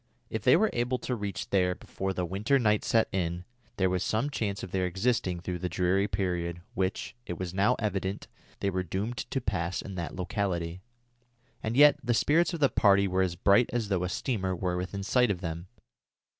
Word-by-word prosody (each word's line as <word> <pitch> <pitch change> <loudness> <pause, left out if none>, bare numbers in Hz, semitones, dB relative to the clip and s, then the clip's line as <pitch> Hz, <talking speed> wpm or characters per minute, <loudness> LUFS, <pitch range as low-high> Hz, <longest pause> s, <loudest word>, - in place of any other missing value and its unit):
If 110 - -2
they 125 +8 +6
were 215 +3 +2
able 120 +1 0
to 125 - -3
reach 100 -4 -5
there 90 -2 +2
before 95 +1 -4
the 90 -1 -2
winter 105 +10 +1
night 105 -4 +2
set 115 -1 +3
in, 90 -1 -2 0.3
there 95 - +3
was 90 -1 0
some 115 +9 0
chance 100 -7 -2
of 90 - -6
their 95 -1 0
existing 95 -2 0
through 90 0 -4
the 90 +1 -2
dreary 95 +4 +1
period 85 -4 -2
which, 95 0 -2
it 90 - -4
was 90 0 -4
now 100 +6 +3
evident, 100 -2 -2 0.3
they 100 - +1
were 95 0 -1
doomed 100 +7 -3
to 135 - -2
pass 90 -6 -2
in 100 - -6
that 85 -2 -5
locality. 90 -3 -2 0.8
And 110 +3 -2
yet 145 0 +7
the 120 -1 +1
spirits 160 +8 +3
of 170 -3 -5
the 140 - +5
party 100 -3 +4
were 95 0 +1
as 90 -2 0
bright 100 +6 +4
as 115 -3 -1
though 95 -3 +1
a 90 - -1
steamer 95 -2 -1
were 90 0 -1
within 95 +2 -4
sight 125 +4 +3
of 95 -3 -1
them. 85 0 -5
95 Hz, 205 wpm, -29 LUFS, 90-110 Hz, 0.8 s, yet